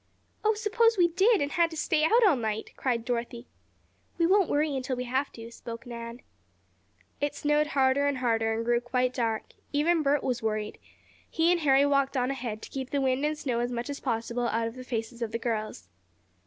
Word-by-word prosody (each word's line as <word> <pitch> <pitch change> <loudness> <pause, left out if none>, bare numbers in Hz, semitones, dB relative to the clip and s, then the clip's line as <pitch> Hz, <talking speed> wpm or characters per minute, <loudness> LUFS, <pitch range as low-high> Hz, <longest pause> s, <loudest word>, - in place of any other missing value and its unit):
"Oh, 435 0 +3
suppose 450 +2 +2
we 345 -1 +5
did, 390 +1 +3
and 285 - -3
had 340 -1 +2
to 320 - -8
stay 310 0 +1
out 455 +8 +5
all 370 -7 +5
night?" 220 -3 -3
cried 235 -3 -1
Dorothy. 240 0 -3 0.7
"We 335 - +3
won't 385 +1 +4
worry 295 -1 +1
until 260 0 -2
we 250 - -3
have 260 +3 -1
to," 230 0 -10
spoke 230 0 -8
Nan. 235 0 -7 1.0
It 290 0 -1
snowed 295 +1 +1
harder 275 -1 +2
and 285 -2 0
harder, 225 -3 +1
and 225 +1 -2
grew 240 0 +2
quite 250 +1 0
dark. 225 -3 -2 0.2
Even 315 +3 +2
Bert 285 -1 +1
was 250 -2 -1
worried. 215 -1 -2 0.5
He 330 +2 +2
and 350 -1 +2
Harry 275 -1 +5
walked 275 -1 +1
on 250 +1 +1
ahead, 235 -5 -5
to - - -9
keep 265 -1 -5
the 285 - 0
wind 265 0 +1
and 305 +1 0
snow 255 -6 -2
as 240 +1 -1
much 245 +3 -3
as 280 - -6
possible 235 -1 -2
out 230 0 0
of 230 - -6
the 255 +1 -9
faces 235 -1 -4
of 230 -2 -2
the 230 - -1
girls. 215 - -3
260 Hz, 210 wpm, -28 LUFS, 235-295 Hz, 1.0 s, we